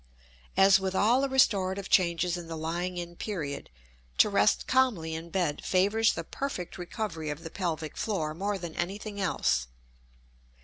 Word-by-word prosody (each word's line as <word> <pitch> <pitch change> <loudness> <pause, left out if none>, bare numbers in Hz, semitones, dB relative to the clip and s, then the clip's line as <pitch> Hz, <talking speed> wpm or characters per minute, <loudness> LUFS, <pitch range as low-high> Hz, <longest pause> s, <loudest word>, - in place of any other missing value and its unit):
As 195 0 +7
with 190 0 -2
all 235 +7 +4
the 275 - 0
restorative 200 -7 +2
changes 175 -1 +2
in 175 -2 -7
the 165 -1 -5
lying 175 +3 -3
in 175 0 -5
period, 160 -9 -4 0.5
to 210 - +5
rest 200 +1 +3
calmly 230 -12 +2
in 165 +1 -6
bed 170 -5 -1
favors 205 +4 +3
the 165 - -4
perfect 190 - -5
recovery 175 -4 -4
of 150 +2 -5
the 165 - -7
pelvic 165 -5 -3
floor 165 -8 -2
more 200 +4 -2
than 170 -3 -6
anything 200 +3 -4
else. 65 - +1
180 Hz, 160 wpm, -29 LUFS, 165-205 Hz, 0.5 s, As